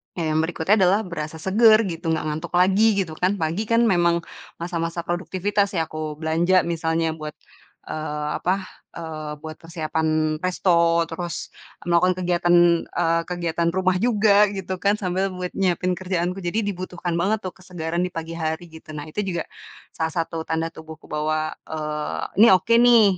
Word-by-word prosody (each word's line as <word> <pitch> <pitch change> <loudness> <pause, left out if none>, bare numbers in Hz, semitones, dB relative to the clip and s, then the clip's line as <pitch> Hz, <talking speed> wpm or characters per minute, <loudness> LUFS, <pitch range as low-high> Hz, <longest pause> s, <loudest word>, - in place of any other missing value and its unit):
ya, 165 -3 -1
yang 155 - +2
berikutnya 165 +4 +1
adalah 190 +3 +4
berasa 155 -2 -5
seger 215 +4 +5
gitu, 165 0 -6
gak - - -3
ngantuk 155 +3 -4
lagi, 195 +4 +4
gitu 165 -3 -9
kan. 185 +3 +2
Pagi, 165 +6 0
kan 230 +1 +3
memang 170 -5 +3 0.4
masa-masa 170 0 -2
produktivitas 195 +3 0
ya, 165 - +2
aku 155 -1 -5
belanja 170 +3 +2
misalnya, 165 -1 0
buat, 155 -1 -7 0.5
eee, 150 -1 -3
apa, 190 +2 0 0.3
eee, 155 -2 -6
buat 155 0 -6
persiapan 155 -2 -1
resto, 170 -2 +3
terus 170 +1 -5 0.4
melakukan 175 +1 +3
kegiatan, 175 0 +2 0.3
eee, 165 -1 +1
kegiatan 170 -1 -1
rumah 185 -1 +2
juga, 210 -3 +4
gitu 190 -2 -4
kan, 200 +1 +4
sambil 190 +1 0
buat 180 -1 -4
nyiapin 185 -1 +1
kerjaanku. 180 0 -2
Jadi, 175 +6 0
dibutuhkan 180 -2 -4
banget 200 +5 +2
tuh, 185 - -5
kesegaran 175 -2 -4
di - - -3
pagi 165 0 -5
hari 160 +1 -2
gitu. 160 0 -14
Nah, 145 - -5
itu 155 - -5
juga 175 -4 -2 0.5
salah 160 0 -1
satu, 165 -1 -2
tanda 160 +1 -1
tubuhku, 160 0 -11
bahwa, 155 +1 -1 0.2
eee, 150 -1 -3 0.2
"Ini, - - +9
oke 205 +6 +1
nih, 240 -2 +7
170 Hz, 160 wpm, -23 LUFS, 160-185 Hz, 0.5 s, Ini